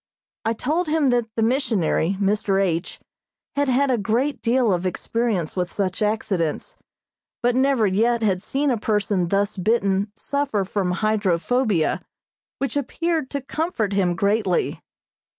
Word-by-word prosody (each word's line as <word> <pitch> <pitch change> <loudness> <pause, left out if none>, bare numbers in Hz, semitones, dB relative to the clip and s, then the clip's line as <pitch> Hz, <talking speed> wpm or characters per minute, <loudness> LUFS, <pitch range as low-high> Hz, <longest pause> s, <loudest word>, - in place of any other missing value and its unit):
I 225 - +2
told 310 +9 -1
him 305 -4 +2
that 240 -2 +1
the 225 - +1
missionary, 215 - +1
Mr. 200 -1 +1
H., 175 -3 -1 0.6
had 285 -1 +1
had 265 +2 +3
a 245 - +1
great 245 +7 0
deal 235 -3 +2
of 180 +1 -1
experience 210 -3 -1
with 180 -1 -1
such 195 -1 -2
accidents, 210 - -1 0.7
but 245 0 +3
never 260 -3 +3
yet 225 +4 +2
had 190 -4 +1
seen 275 +5 0
a 235 - 0
person 205 -4 0
thus 200 +3 0
bitten 200 0 +1
suffer 270 -5 -1
from 190 -1 -1 0.2
hydrophobia, 210 -1 +1 0.6
which 275 +1 -2
appeared 315 +1 -1
to 280 - -3
comfort 275 - -2
him 185 -3 +1
greatly. 200 0 0
220 Hz, 140 wpm, -23 LUFS, 195-260 Hz, 0.7 s, had